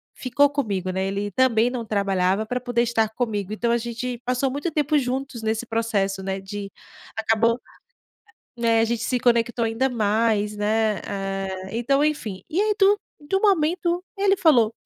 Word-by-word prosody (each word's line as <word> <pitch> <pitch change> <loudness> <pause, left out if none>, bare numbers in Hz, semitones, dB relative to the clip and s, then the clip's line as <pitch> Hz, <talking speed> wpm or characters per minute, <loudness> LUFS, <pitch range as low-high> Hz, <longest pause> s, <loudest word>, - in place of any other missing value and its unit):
ficou 280 +3 +2
comigo, 200 -10 -2
né, 190 +1 -1
ele 200 +1 -2
também 240 0 +3
não 245 -2 -4
trabalhava, 195 0 +1
para 250 +2 -3
poder 245 -1 +1
estar 225 -2 +1
comigo, 215 -4 -3
então 235 +2 -1
a 235 - +3
gente 240 +1 -4
passou 255 +2 +1
muito 290 +4 -3
tempo 300 0 +1
juntos 255 -2 -3
nesse 220 +2 -1
processo, 205 -4 -1
né, 195 0 -2
de 200 0 -6 0.5
acabou 225 +2 +2 1.0
né, 230 -1 +3
a - - +3
gente 235 0 -2
se 250 -1 0
conectou 235 -1 +2
ainda 225 +4 +1
mais, 215 -2 +1
né, 215 0 +1
hã, 195 -1 -3 0.2
então 265 +5 +1
enfim, 220 -11 -2
e 340 - -1
aí 425 0 +2
do 400 +1 +5 0.2
do 295 +7 -1
momento, 350 -2 +2
ele 395 0 +3
falou: 240 - +4
230 Hz, 165 wpm, -23 LUFS, 210-260 Hz, 1.0 s, do